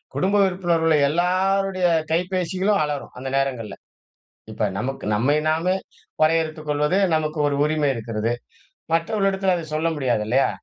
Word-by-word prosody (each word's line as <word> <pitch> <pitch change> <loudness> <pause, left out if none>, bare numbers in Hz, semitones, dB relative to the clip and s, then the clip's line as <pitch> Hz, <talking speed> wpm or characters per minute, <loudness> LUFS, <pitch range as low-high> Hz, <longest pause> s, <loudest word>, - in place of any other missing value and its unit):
குடும்ப 195 +2 +1
உறுப்பினர்கள 170 -3 +1
எல்லோருடைய 185 +3 +1 0.2
கைப்பேசிகளும் 185 +3 0
அலறும் 145 -2 -4
அந்த 135 - -6
நேரங்கள்ல. 130 -5 -2 0.8
இப்ப - - -1
நமக்கு, 135 +6 -4
நம்மை 130 +8 +2
நாமே 165 +4 +1 0.5
வரையறுத்து 155 0 +1
கொள்வது 150 +5 +1 0.2
நமக்கு 155 0 -2
ஒரு 145 - 0
உரிமை 150 -1 +1
இருக்கிறது. 115 0 -2 0.6
மற்றவர்களிடத்தில 195 +2 +1
அத 165 - -5
சொல்ல 160 +2 +1
முடியாதில்லையா? 125 -1 +1
160 Hz, 120 wpm, -22 LUFS, 140-185 Hz, 0.8 s, நம்மை